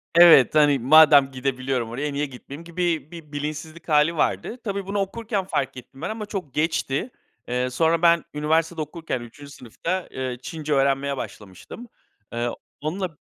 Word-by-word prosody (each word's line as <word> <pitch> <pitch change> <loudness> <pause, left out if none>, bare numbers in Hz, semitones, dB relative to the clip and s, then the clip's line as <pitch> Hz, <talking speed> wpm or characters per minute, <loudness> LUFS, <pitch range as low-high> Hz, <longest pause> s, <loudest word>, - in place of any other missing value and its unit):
Evet, 170 -6 +8
hani, 145 -2 +5
"Madem 145 +1 +7
gidebiliyorum 130 -2 -2
oraya, 145 +5 -3
niye 145 +1 -1
gitmeyeyim?" 140 +3 -10
gibi 170 -3 -2
bir 165 -3 -11
bilinçsizlik 155 +3 -6
hâli 150 +2 +3
vardı. 225 +8 -1
Tabii 200 -2 -3
bunu 200 +1 -1
okurken 205 +1 -2
fark 135 -8 -2
ettim 135 +2 -12
ben 175 - -3
ama 220 -1 -5
çok 190 - -6
geçti. 155 - -1 0.4
Eee, 125 +1 -1
sonra 165 +5 +1
ben 170 -1 +4
üniversitede 155 +2 0
okurken 155 -4 -4
3. 140 +5 -12
sınıfta, 170 +9 -4
eee, 130 -2 -4
Çince 155 0 -4
öğrenmeye 135 0 +1
başlamıştım. 105 - -9 0.5
Eee, 120 +1 -1 0.3
onunla 170 +2 -3
150 Hz, 155 wpm, -23 LUFS, 135-170 Hz, 0.5 s, Evet